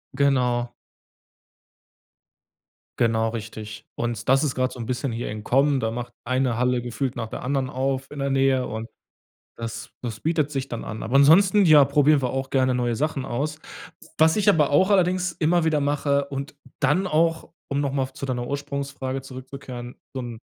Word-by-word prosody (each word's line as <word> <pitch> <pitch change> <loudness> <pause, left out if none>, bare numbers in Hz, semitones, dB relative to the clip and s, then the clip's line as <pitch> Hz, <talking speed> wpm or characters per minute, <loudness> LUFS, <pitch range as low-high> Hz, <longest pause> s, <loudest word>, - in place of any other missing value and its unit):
Genau. 125 -3 +1 2.3
Genau, 115 -1 +2
richtig, 110 -1 -7
und 120 -2 -3
das 135 +3 +4
ist 140 - -1
grad 130 0 0
so 125 - -11
'n 115 - -5
bisschen 125 +1 -2
hier 115 +1 -4
im 105 0 -6
Kommen, 135 +3 +3
da 110 -2 -1
macht 120 +1 -5
eine 130 -1 0
Halle 125 0 +1
gefühlt 125 +2 -3
nach 115 -3 -4
der - - -7
anderen 135 0 -1
auf 135 0 -2
in 145 - -10
der 140 0 -1
Nähe 135 -1 +2
und 110 +1 -5 0.7
das 115 -1 -6
das 115 -3 -5
bietet 155 -2 0
sich 135 -1 -3
dann 120 - -5
an, 110 - -6
aber 125 +4 +1
ansonsten, 185 +8 +6
ja, 150 -4 +8
probieren 145 +1 +3
wir 125 - 0
auch 135 +1 -3
gerne 130 -1 +2
neue 120 -1 0
Sachen 140 +1 -1
aus. 150 +6 -3 0.6
Was 160 +3 +4
ich 210 -1 +1
aber 160 -7 +4
auch 185 +8 +4
allerdings 185 -1 +2
immer 165 +1 +1
wieder 155 -2 +2
mache 140 0 +1
und 140 +1 -6 0.2
dann 165 +7 +2
auch 165 +1 +1 0.2
um 140 0 -1
noch 140 -2 0
mal 135 -1 -2
zu 140 - -6
deiner 125 -2 -2
Ursprungsfrage 140 -2 -4
zurückzukehren, 130 -2 -9 0.2
so 130 - -3
'n 120 -2 -6
135 Hz, 180 wpm, -24 LUFS, 120-145 Hz, 2.3 s, ja